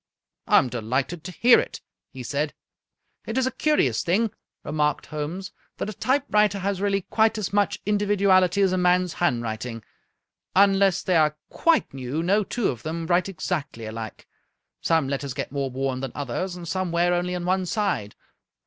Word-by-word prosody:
" - - -63
I - - +6
am 130 - +4
delighted 125 +8 -2
to 180 - -5
hear 235 +6 +6
it," - - -4 0.3
he 130 -3 -8
said. 145 +4 -2 0.3
" - - -42
It 225 - -3
is 260 - +2
a 260 - 0
curious 140 - +1
thing," 210 +6 +1 0.3
remarked 150 -1 0
Holmes, 160 +6 -5
" - - -43
that 215 - -3
a - - -9
type 265 +6 0
writer 210 -1 +3
has 195 0 -2
really 200 -1 +1
quite 220 0 +3
as 205 -2 -3
much 205 0 +2
individuality 200 -2 +3
as 190 - +3
a 185 - +1
man's 180 0 +2
handwriting. 115 -5 -2 0.7
Unless 195 -1 +4
they 180 -2 +2
are 155 -1 +3
quite 330 - +2
new 135 +4 -3
no 200 +4 +3
two 230 +2 -1
of 120 -4 -4
them 165 +3 -4
write 175 +2 +2
exactly 155 -9 -4
alike. 110 0 -7 0.5
Some 160 -4 +2
letters 140 -1 -3
get - - -4
more 140 -1 -2
worn 130 0 -2
than 130 -2 -5
others, 145 +7 -3
and 175 -1 -8
some 185 +1 -2
wear 175 +1 +2
only 180 +1 -1
on 175 -1 -4
one 185 0 +1
side. 185 - -1
175 Hz, 185 wpm, -25 LUFS, 140-195 Hz, 0.7 s, I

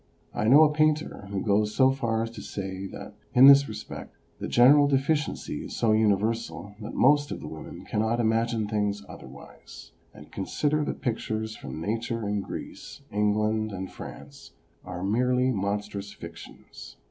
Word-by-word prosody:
I - - -1
know 140 +7 +8
a 150 -1 +3
painter 155 -8 0
who 100 -1 -3
goes 105 0 +1
so 130 -1 +5
far 115 -4 -1
as 115 - -5
to 115 -3 -9
say 95 -1 -5
that, - - -9 0.2
in 125 +2 +9
this 140 -1 +8
respect, 105 0 -8 0.2
the - - -4
general 145 +4 +6
de 140 -1 +3
ficiency 150 +3 -2
is - - -7
so 115 - +2
universal 105 -3 0
that 105 - -7
most 145 +2 +4
of - - -5
the - - -8
women 80 - -9
cannot 110 +2 0
imagine 115 -1 +1
things 105 -1 -1
otherwise, - - -13 0.2
and 75 - -15
consider 150 +9 -1
that - - -5
pictures 110 -2 -3
from - - -8
Nature 115 +4 -3
in 105 0 -1
Greece, 120 - -8
England 105 +1 +1
and 95 -1 -6
France 70 0 -11 0.3
are 90 0 -6
merely 125 +5 +2
mon 100 -1 -1
strous 100 -1 -7
fictions. 85 0 -12
110 Hz, 165 wpm, -27 LUFS, 100-125 Hz, 0.3 s, in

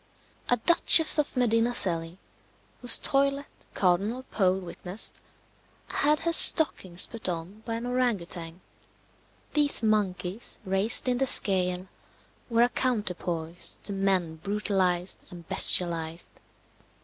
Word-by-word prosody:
A 245 - +2
Duchess 320 +3 +4
of 290 -3 -3
Medina 235 0 0
Celi, 165 -4 0 0.6
whose 245 -2 +5
toilet 275 +1 -1 0.3
Cardinal 200 +7 -1
Pole 190 -3 0
witnessed, 180 +2 0 0.7
had 300 +1 -1
her 335 0 -2
stockings 185 - +5
put 230 -5 -3
on 175 +5 -8
by 230 - -4
an 230 +1 -7
orang 245 -3 -1
outang. 170 0 -8 0.9
These 290 -5 0
monkeys 205 -1 -3
raised 195 +7 +4
in 250 -1 -1
the 270 - -1
scale 185 -4 +2 0.6
were 230 0 +2
a 245 - +1
counterpoise 180 -9 -3
to 200 - -4
men 190 -4 -2
brutalized 190 -1 -2
and 175 -2 -14
bestialized. 165 -2 0
195 Hz, 115 wpm, -25 LUFS, 180-245 Hz, 0.9 s, whose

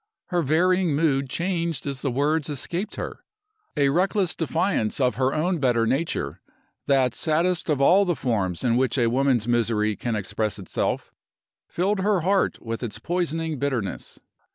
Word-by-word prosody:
Her 175 -2 +1
varying 170 +2 +2
mood 140 -3 +1
changed 170 0 -1
as 140 -2 -4
the 140 - -1
words 145 +4 0
escaped 170 +7 -3
her. - - -6 0.5
A 140 -1 +4
reckless 185 +3 +1
defiance 165 - 0
of 125 -2 +2
her 130 0 +2
own 170 +4 0
better 120 -4 +2
nature 140 +8 -2 0.5
that 130 -3 +3
saddest 165 +3 0
of 150 -3 +1
all 180 +8 +5
the 175 -3 0
forms 95 - -1
in 120 -1 +2
which 130 +2 +1
a 120 -2 +2
woman's 130 -3 +2
misery 115 -3 +1
can 120 +1 -3
express 105 +1 -2
itself 95 -3 -3 0.5
filled 195 +3 0
her 195 -1 +2
heart 190 +3 +1
with 115 0 -4
its 115 -5 -4
poisoning 165 -3 -2
bitterness. 130 -9 -3
140 Hz, 155 wpm, -24 LUFS, 120-170 Hz, 0.5 s, all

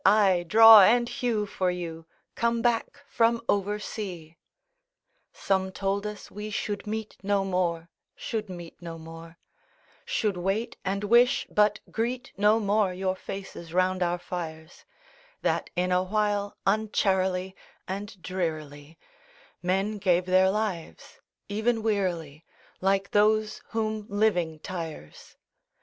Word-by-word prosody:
—aye, 195 -3 +4
draw 225 +3 +10
and 240 +5 +5
hew 240 -5 -1
for 185 -2 -1
you, 165 -2 -5 0.3
Come 235 0 0
back 240 +4 0
from 230 0 +2
oversea." 200 -4 -2
III 170 - -32 0.9
Some 190 -1 -1
told 200 +2 -2
us 210 -1 -8
we 210 +1 -6
should 205 0 -3
meet 220 0 -4
no 200 0 +1
more, 175 -3 -1 0.3
Should 215 -3 -4
meet 175 -2 -9
no 165 -1 -7
more; 165 +1 -11 0.7
Should 210 -5 -1
wait, 195 +6 -2
and 195 +1 -2
wish, 240 +5 +4
but 210 0 +3
greet 245 +3 -2
no 210 +2 +4
more 205 -2 +2
Your 185 0 -1
faces 190 -4 -8
round 185 0 +2
our 175 0 +1
fires; 165 -2 -7 0.6
That, - - 0
in 180 0 0
a 180 0 +3
while, 205 +1 -1
uncharily 190 -3 +1 0.3
And 200 +1 -6
drearily 155 -4 -4 0.6
Men 195 +4 0
gave 180 -2 +2
their 185 +1 +4
lives—even 210 - -3
wearily, 175 -8 -1 0.4
Like 195 +1 +1
those 215 +1 +2
whom 215 -2 -2
living 200 -6 +1
tires. 165 - -8
195 Hz, 125 wpm, -27 LUFS, 180-215 Hz, 0.9 s, draw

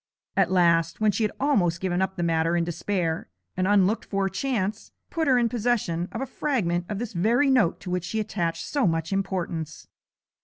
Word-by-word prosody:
At 190 -2 +2
last, 170 -2 +3
when 215 -1 +3
she 220 - -1
had 210 - +1
almost 190 - +2
given 185 0 -1
up 190 0 -1
the 175 - -2
matter 165 0 +1
in 170 - +2
despair, 170 -1 -2 0.3
an 185 0 0
unlooked 205 +1 +3
for 195 -1 0
chance 210 -1 -2 0.2
put 325 -3 -1
her 260 -2 +5
in 240 -1 +3
possession 215 -7 -1
of 230 - -4
a - - -1
fragment 180 - -1
of 210 - -3
this 235 +1 -5
very 235 +10 +3
note 215 -10 +3
to 180 - -6
which 180 -1 -1
she 220 +4 -2
attached 175 -6 -2
so 280 -8 +1
much 165 +2 -1
importance. 180 -5 -3
190 Hz, 195 wpm, -25 LUFS, 170-220 Hz, 0.3 s, her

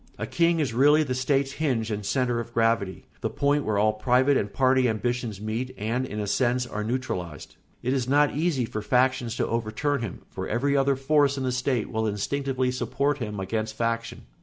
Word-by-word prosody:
A - - -3
king 170 -1 +2
is 140 -7 0
really 145 +5 +5
the 130 -4 -2
state's 135 +1 +1
hinge 125 -7 -1
and 105 0 -3
centre 120 +2 0
of 115 0 -7
gravity, 115 -4 +1 0.2
the - - -1
point 145 +1 +1
where 105 -1 0
all 110 +1 +3
private 125 +6 +3
and 100 -5 0
party 130 +1 +3
ambitions 115 -1 -2
meet 115 +5 -4
and, 120 +5 -1
in 105 - -5
a 105 - -1
sense, 125 +4 +1
are 105 -3 -4
neutralised. 105 - -4 0.3
It 125 +2 +1
is 130 -2 -1
not 145 +1 +4
easy 150 -5 +1
for 110 -1 -5
factions 125 +1 +1
to - - 0
overturn 115 +5 -1
him, 110 -6 -6
for - - -6
every 140 +6 +1
other 140 0 +3
force 140 +1 +2
in 135 - -2
the 130 - 0
state 125 -2 -1
will 110 0 0
instinctively 130 +5 -1
support 130 +4 -1
him 105 -4 -4
against 110 +3 -3
faction. 115 0 -2
125 Hz, 200 wpm, -26 LUFS, 110-135 Hz, 0.3 s, really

